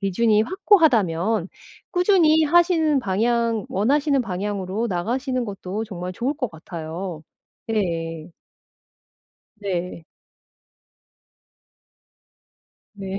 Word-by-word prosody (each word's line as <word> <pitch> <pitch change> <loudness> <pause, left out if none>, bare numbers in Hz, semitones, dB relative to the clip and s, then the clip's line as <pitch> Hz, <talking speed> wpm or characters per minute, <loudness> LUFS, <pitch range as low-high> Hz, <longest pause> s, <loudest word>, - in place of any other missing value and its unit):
기준이 210 +2 +2
확고하다면 225 - +2 0.4
꾸준히 355 -4 +4
하시는 325 -2 +3
방향 230 +1 0
원하시는 280 +8 +1
방향으로 200 +1 -3
나가시는 250 +7 -1
것도 200 0 -5
정말 180 -3 -6
좋을 250 +8 -1
것 255 -7 -3
같아요. 165 +1 -7 0.5
예예. 165 -5 -2 1.3
네. 180 -4 -4 2.9
네. 195 -1 -5
210 Hz, 190 characters per minute, -23 LUFS, 180-265 Hz, 2.9 s, 꾸준히